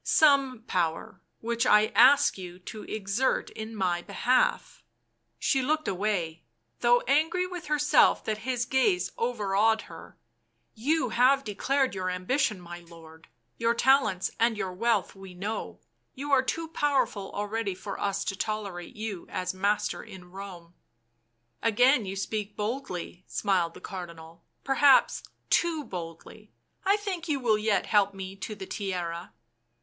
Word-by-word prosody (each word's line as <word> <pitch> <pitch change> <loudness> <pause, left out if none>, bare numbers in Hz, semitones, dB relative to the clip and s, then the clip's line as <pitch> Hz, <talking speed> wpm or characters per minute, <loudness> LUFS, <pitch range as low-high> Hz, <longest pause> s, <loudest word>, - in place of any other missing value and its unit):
" - - -49 0.2
Some 270 -5 +4
power— 165 -3 -2 0.2
which 230 0 -1
I 210 +1 +5
ask 280 +5 +6
you 180 -2 -9
to 200 +4 -9
exert 215 +5 -1
in 220 +1 -7
my 180 -4 0
behalf." 235 +7 0 0.6
She 270 - +1
looked 310 +4 0
away, 180 -4 -1 0.4
though 240 0 +4
angry 320 +7 +1
with 360 -2 -7
herself 295 0 +4
that 215 -1 -2
his 240 +1 -2
gaze 360 - +1
overawed 220 -2 +1
her. 165 -1 -13 0.3
" 115 0 -47 0.2
You 315 -6 +2
have 260 +4 +4
declared 265 +5 0
your 185 -1 -2
ambition, 200 +4 0
my 175 0 -9
lord; 165 -1 -15 0.3
your 230 0 +2
talents 230 -8 +3
and 230 -1 +2
your 190 -3 -3
wealth 220 +1 0
we 195 -2 -12
know 205 +5 -5 0.2
— - - -47
you 285 +2 -5
are 270 -2 +6
too 325 +5 -3
powerful 275 -10 0
already 205 -1 -2
for 195 +1 -7
us 200 0 -1
to 195 - -2
tolerate 205 -1 -4
you 210 -4 -5
as 185 - -3
master 200 +3 0
in 185 -4 -12
Home." 180 -3 -10 0.5
" 120 0 -47
Again 245 0 +3
you 190 - -4
speak 205 +1 -4
boldly," 210 -6 -4
smiled 180 -4 0
the - - -10
Cardinal. 170 -3 -9 0.2
C£ - - -46
Perhaps 275 0 +4 0.3
too 330 -3 +2
boldly 180 - -9 0.2
— - - -39
I 400 +1 +5
think 380 -5 -4
you 285 -2 +1
will 220 -4 +2
yet 210 -1 +1
help 200 -2 +2
me 190 0 -7
to 215 +2 -6
the 195 -2 -7
Tiara." 180 -4 -4
210 Hz, 155 wpm, -28 LUFS, 185-255 Hz, 0.6 s, ask